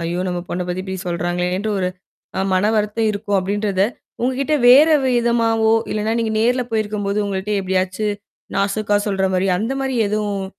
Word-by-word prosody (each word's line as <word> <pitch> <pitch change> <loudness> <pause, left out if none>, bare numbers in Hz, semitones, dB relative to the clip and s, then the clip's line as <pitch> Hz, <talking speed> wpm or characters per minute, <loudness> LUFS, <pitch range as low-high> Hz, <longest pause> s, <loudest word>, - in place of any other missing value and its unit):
ஐயோ! 175 +2 -2
நம்ம 175 -1 -2
பொண்ண 180 +1 -2
பத்தி 180 +1 -3
இப்படி 190 -1 -4
சொல்றாங்களேன்ட்டு, 180 +4 -1
ஒரு 180 - +1 0.7
மனவருத்தம் 210 +2 +1
இருக்கும் 205 -1 -1
அப்படின்றத 200 0 -1 0.4
உங்ககிட்ட 265 +4 0
வேற 280 +6 +8 0.2
விதமாவோ, 230 -2 +2 0.2
இல்லனா 215 +1 -1
நீங்க 225 -1 -1
நேர்ல 250 +3 +2
போயிருக்கும்போது 210 -2 -1
உங்கள்ட்ட 195 +1 -3
எப்படியாச்சு 185 +2 -1 0.5
நாசுக்கா 205 +1 +1
சொல்ற 195 -2 0
மாரி 185 +1 +1
அந்த 225 +5 -2
மாரி 265 -1 -2
எதுவும் 205 -2 -2
205 Hz, 140 wpm, -20 LUFS, 190-225 Hz, 0.7 s, வேற